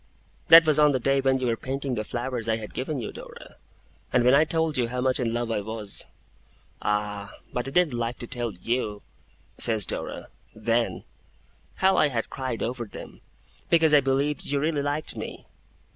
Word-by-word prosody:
'That 165 0 +10
was 155 -1 +3
on 150 -1 +5
the 130 - +1
day 135 +2 +2
when 135 0 +2
you 130 - -2
were 115 -2 +1
painting 135 +2 -4
the 110 - -2
flowers 120 0 -3
I 110 - +3
had 110 -2 -8
given 135 +2 -3
you, 110 - -5
Dora, - - -12 0.5
and 125 - +3
when 125 +1 +5
I 150 +3 +6
told 160 -1 0
you 125 -3 +2
how 125 +2 -4
much 130 0 +2
in 120 -3 0
love 120 0 -2
I 105 - 0
was.' 105 -1 -2 0.7
'Ah! 105 -1 -2 0.2
but 125 +1 -2
I - - -2
didn't 170 -1 +2
like 120 0 -2
to - - -7
tell 120 -1 -3
you,' 105 +2 -3 0.6
says 110 -4 +3
Dora, - - -3 0.3
'then, 115 +2 0 0.7
how 190 0 +3
I - - +5
had 120 -5 -3
cried 130 -3 -3
over 120 0 -3
them, 105 - -11 0.5
because 160 -2 +4
I 150 - +8
believed 135 +2 0
you 140 0 +1
really 150 0 0
liked 145 +2 -2
me! - - -7
125 Hz, 190 wpm, -26 LUFS, 115-140 Hz, 0.7 s, That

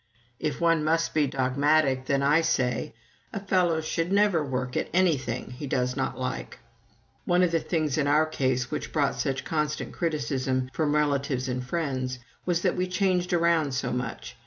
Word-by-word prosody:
If 150 - -2
one 165 -2 +3
must 165 +2 +1
be 150 -2 +2
dogmatic, 135 +1 +2
then 140 0 +1
I 150 +4 +4
say, 125 -8 0 0.4
"A - - -4
fellow 180 -4 +1
should 165 +2 -2
never 200 -5 +3
work 125 -2 -3
at - - -1
anything 140 -11 +1
he 140 +3 -6
does 125 -1 0
not 130 -1 -2
like." 125 -1 -4 0.7
One 180 +1 +3
of 175 - +2
the 165 - +2
things 155 -3 -1
in 140 - +1
our 150 +2 +4
case 130 -5 -1
which - - -4
brought 145 -3 +1
such 135 -2 -1
constant 150 -1 -2
criticism 135 -5 -1
from 150 +2 +1
relatives 140 -3 0
and 125 0 -2
friends 130 -3 -2 0.3
was 175 -1 +1
that - - +2
we 180 0 0
changed 185 -1 0
around 165 -5 +2
so 130 -1 -1
much. 120 - -5
145 Hz, 175 wpm, -27 LUFS, 130-165 Hz, 0.7 s, I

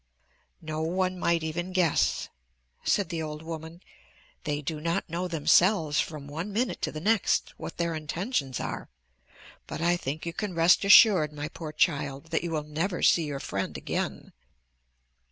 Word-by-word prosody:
"No 155 0 -3
one 185 +3 -1
might 170 -1 +1
even 175 +3 -3
guess," 150 - +2 0.6
said 200 -5 +1
the 165 -2 -3
old 155 0 -5
woman. 160 +1 -7 0.6
"They 145 -1 -1
do 150 +2 -4
not 165 +1 -1
know 175 +2 -3
themselves 165 0 +3
from 150 -3 -3
one 165 +8 -5
minute 235 +4 -1
to - - -1
the 155 - -6
next 210 +4 +1
what - - -7
their 170 -1 0
intentions 155 - -2
are, - - -5 0.8
but 155 0 -5
I 175 +2 +2
think 150 0 -4
you 170 - -3
can 205 -2 -4
rest 165 +3 +5
assured, 200 -6 +7
my 150 0 -5
poor 155 -1 -7
child, 140 +1 0
that 160 - 0
you 170 - -2
will 155 -2 -2
never 165 +5 -2
see 165 - +5
your 145 -2 -4
friend 100 -7 -3
again." - - -4
160 Hz, 165 wpm, -28 LUFS, 150-175 Hz, 0.8 s, assured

